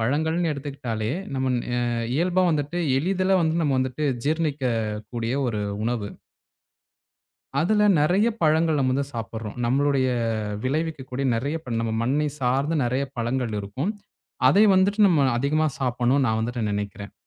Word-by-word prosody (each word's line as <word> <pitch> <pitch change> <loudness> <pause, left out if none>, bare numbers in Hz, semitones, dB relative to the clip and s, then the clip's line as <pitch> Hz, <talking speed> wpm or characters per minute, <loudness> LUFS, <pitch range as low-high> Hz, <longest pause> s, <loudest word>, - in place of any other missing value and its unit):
பழங்கள்ன்னு 160 +8 0
எடுத்துக்கிட்டாலே, 130 -6 -4 0.3
நம்மன் 130 -1 0 0.2
அ - - +1 0.4
இயல்பா 180 +3 +2
வந்துட்டு, 150 +2 -1 0.2
எளிதில 185 +3 +1
வந்து 160 0 +1
நம்ம 145 -3 +1
வந்துட்டு 130 +3 -1 0.2
ஜீரணிக்கக்கூடிய 120 -7 -1
ஒரு 105 -3 -2 0.2
உணவு. 115 -3 -2 1.5
அதுல 210 +5 +3 0.2
நெறையா 190 +10 +3
பழங்கள் 160 0 +3
நம்ம 130 -1 +2
வந்து 140 +2 0
சாப்பிடுறோம். 110 -1 -5
நம்மளுடைய 135 +1 +2 0.6
விளைவிக்கக்கூடிய 140 -2 -2
நெறையா 140 +8 -2
ப்ப 120 -6 -5
நம்ம 115 -1 -2
மண்ணை 145 +5 +1
சார்ந்த 135 +5 +1
நெறையா 130 +3 0
பழங்கள் 120 -2 -1
இருக்கும். 130 - -3 0.6
அதை 205 +2 +6
வந்துட்டு, 195 +3 +2
நம்ம 150 -6 +3
அதிகமா 155 +4 +1
சாப்பிடணும்னு, 125 +1 +1
நான் 110 -1 +1
வந்துட்டு 120 0 -2
நெனைக்கிறேன். 100 0 -4
135 Hz, 130 wpm, -24 LUFS, 120-160 Hz, 1.5 s, அதை